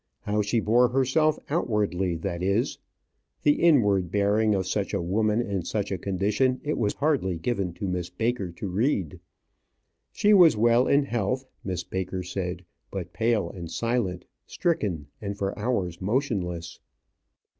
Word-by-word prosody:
How 105 +1 0
she 105 +3 +1
bore 120 +4 +4
herself 135 +5 +2
outwardly, 105 - 0
that 85 +1 -4
is. 100 +8 0 0.6
The 145 0 +3
inward 105 - +4
bearing 105 +2 +2
of 95 -1 -1
such 100 +1 -1
a - - 0
woman 105 +5 +1
in 100 -5 -2
such 105 +2 -2
a 95 - -1
condition 105 +8 0
it 150 0 -2
was 105 -3 0
hardly 140 - 0
given 100 -1 -1
to 100 +3 -4
Miss 90 -1 -2
Baker 110 +1 -1
to 100 - -5
read. 95 - 0 0.9
She 210 +1 +3
was 175 - +7
well 120 +3 +4
in 140 +1 +4
health, 125 +1 -1 0.2
Miss 90 -2 -3
Baker 95 0 -4
said, 90 -1 -4 0.2
but 90 -3 -6
pale 110 -6 +1
and 85 -4 -8
silent, 95 -1 -1 0.2
stricken, 100 - -1 0.2
and 100 -1 -4
for 100 -1 -2
hours 100 -7 -1
motionless. 95 - -2
100 Hz, 150 wpm, -26 LUFS, 90-120 Hz, 0.9 s, was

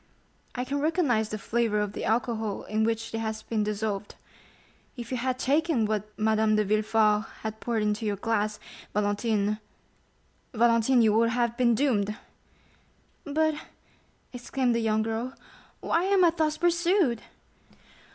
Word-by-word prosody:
I 250 0 -2
can 280 +2 -2
recognize 285 -9 +1
the 215 - -3
flavor 225 0 0
of 210 -1 -2
the - - -4
alcohol 225 -2 -1
in 215 +1 -1
which 225 0 -1
it 225 - -2
has 220 -1 -4
been 220 -2 -1
dissolved. 210 -1 -3 0.8
If 235 0 -7
you 255 - -1
had 255 +1 -1
taken 285 -2 +1
what 215 0 -2
Madame 220 0 +2
de 215 - +3
Villefort 215 +1 +2 0.2
has 220 -1 -2
poured 230 -3 -1
into 210 +1 -1
your 205 - 0
glass, 210 0 -1 0.4
Valentine—Valentine—you 220 +2 0
would 230 +1 +3
have 235 -1 0
been 240 -2 +3
doomed!" 215 -5 0 1.1
"But," 315 +2 +1 0.8
exclaimed 250 0 -1
the 230 - +1
young 220 -1 +1
girl, 225 +4 -3 0.5
"why 335 +2 +1
am 385 -2 +4
I 335 - +5
thus 310 -2 0
pursued?" 345 - +2
225 Hz, 140 wpm, -27 LUFS, 215-255 Hz, 1.1 s, I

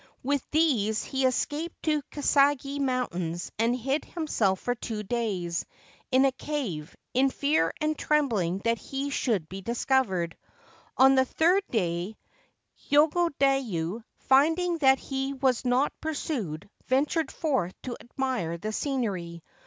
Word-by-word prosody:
With 280 +1 0
these 240 -10 +2
he 265 -1 +1
escaped 295 +6 -2
to 305 -2 +1
Kasagi 285 -1 +2
Mountain, 245 -11 -1 0.2
and 230 +2 +2
hid 270 +4 -1
himself 225 - 0
for 245 - -1
two 225 -3 -5
days 190 -7 -2 0.5
in 260 +1 +4
a 270 - +4
cave, 245 - -4 0.2
in 265 +2 +4
fear 280 - +1
and 310 0 0
trembling 220 - +1
that 230 0 +1
he 275 +1 -4
should 215 - 0
be 190 +3 -7
discovered. 220 -6 0 0.6
On 265 +1 +7
the 260 -1 +4
third 345 +8 +3
day 180 -1 -1 0.7
Yogodayu, 275 - +2
finding 325 +5 +3
that 265 -2 +5
he 270 0 -3
was 260 -2 +1
not 250 +3 +2
pursued, 225 - -3 0.2
ventured 285 +3 +1
forth 260 - -1
to 245 -2 -4
admire 240 -10 -2
the 215 +5 -4
scenery. 195 - -2
260 Hz, 130 wpm, -27 LUFS, 205-285 Hz, 0.7 s, On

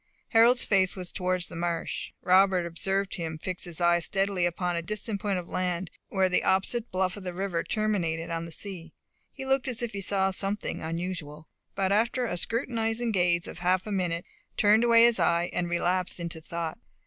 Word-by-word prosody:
Harold's 235 +2 +5
face 190 -2 +3
was 180 -2 -5
towards 185 -1 -1
the - - -9
marsh. 170 0 -2
Robert 185 -1 +4
observed 195 +3 -1
him 160 -3 -3
fix 180 +3 -4
his 175 -2 -3
eye 175 0 +4
steadily 195 0 0
upon 175 0 -2
a 170 - -1
distant 215 +2 -3
point 200 -3 0
of 175 -1 -5
land, 180 -1 -2 0.2
where 190 -1 +2
the 180 - +1
opposite 215 +5 +1
bluff 185 0 0
of 205 - -8
the 180 -1 -5
river 185 -3 -1
terminated 175 -7 -1
on 165 0 -2
the 165 - -9
sea. 170 -3 -7 0.4
He 265 - -7
looked 270 0 +1
as 245 -2 -2
if 235 - -2
he 200 - -4
saw 190 0 +1
something 195 +2 -1
unusual, 165 -2 -5 0.3
but 190 -1 0
after 235 +4 +2
a 200 - -2
scrutinizing 230 +3 -1
gaze 175 -3 +2
of - - -8
half 180 +1 +1
a 215 - -5
minute, 175 -3 -1 0.3
turned 215 +2 +5
away 230 -1 +6
his 235 -3 +5
eye, 170 +1 +2
and 175 -1 -1
relapsed 180 +1 0
into 170 -1 -5
thought. 170 -1 -4
185 Hz, 195 wpm, -28 LUFS, 170-205 Hz, 0.4 s, away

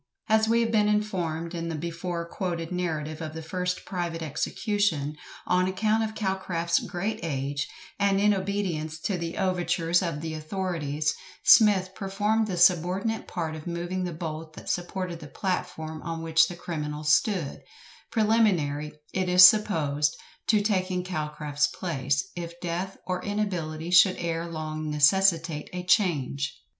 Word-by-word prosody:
As 220 0 +3
we 230 +1 +3
have 230 -1 0
been 210 -2 +3
informed 180 -6 -1
in 165 -1 -3
the 165 - -3
before 170 +1 -4
quoted 170 -3 -3
narrative 160 -3 -3
of 155 -1 -5
the 160 - -6
first 180 +2 -3
private 170 -3 -3
execution, 160 - -1 0.3
on 180 0 +2
account 215 +4 +1
of 220 0 -4
Calcraft's 190 -4 0
great 195 +5 -3
age, 140 -2 -2 0.3
and 200 -1 +3
in 210 +1 +4
obedience 185 -5 -2
to 200 - -1
the 170 -1 -4
overtures 175 -2 +1
of 165 -5 -3
the 160 0 -4
authorities, 155 -2 -2 0.3
SMITH 205 -7 +6
performed 210 +3 0
the 185 -3 -3
subordinate 180 +5 +2
part 160 -3 -3
of 155 +2 -9
moving 175 +2 -3
the 180 - -2
bolt 160 -1 -6
that - - -5
supported 175 -1 -3
the 150 - -9
platform 160 -3 -3
on 165 -1 -5
which 165 0 +4
the 175 - -7
criminal 150 -3 -4
stood; 155 +1 +1 0.5
preliminary, 190 -10 +2 0.2
it 185 -1 0
is 180 +1 +8
supposed, 160 -7 +5 0.3
to 210 -2 +3
taking 185 -3 0
Calcraft's 150 -4 -1
place, 140 -2 -2
if 170 0 -6
death 180 +2 -3
or 180 -1 -2
inability 175 -6 -2
should 180 +1 +6
ere 170 0 -2
long 155 -1 -4
necessitate 165 0 +3
a 180 0 -4
change. 145 - +1
175 Hz, 150 wpm, -27 LUFS, 155-190 Hz, 0.5 s, is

